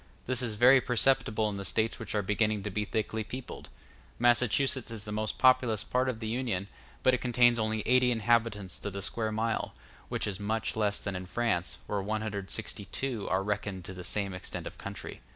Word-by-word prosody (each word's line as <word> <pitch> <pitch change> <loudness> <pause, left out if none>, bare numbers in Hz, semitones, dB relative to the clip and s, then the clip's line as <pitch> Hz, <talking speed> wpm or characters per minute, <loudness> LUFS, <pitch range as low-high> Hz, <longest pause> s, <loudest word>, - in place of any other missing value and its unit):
*c - - -26 0.2
This 130 0 -1
is 115 -4 -2
very 125 +4 +7
perceptible 120 -3 +2
in 100 -1 -3
the 100 - -4
States 110 +4 0
which 110 -1 -4
are 105 - +1
beginning 105 +1 +1
to 105 - -3
be 105 +2 -1
thickly 110 +1 -2
peopled; 125 +4 -8 0.5
Massachusetts 120 +2 +3
is 115 -3 -5
the 105 - -5
most 110 0 -2
populous 125 -4 +4
part 130 +1 +1
of 115 -3 -3
the 110 - -4
Union, 110 -5 -2 0.3
but 130 - +5
it 125 - +2
contains 120 -1 +4
only 110 -1 0
eighty 125 +1 +5
inhabitants 115 -4 +1
to - - -4
the 100 0 -5
square 110 +2 -1
mile, 110 +1 -1 0.3
which - - -1
is 100 -2 -3
must 110 +2 -1
less 105 -2 +1
than 100 -2 -4
in 90 0 -5
France, 95 -5 -1
where 100 -1 -1
162 110 +2 -3
are 95 +1 +1
reckoned 100 -3 -3
to 95 - -7
the 90 0 -8
same 100 0 -1
extent 90 - -5
of - - -8
country. - - -6
110 Hz, 200 wpm, -30 LUFS, 100-120 Hz, 0.5 s, very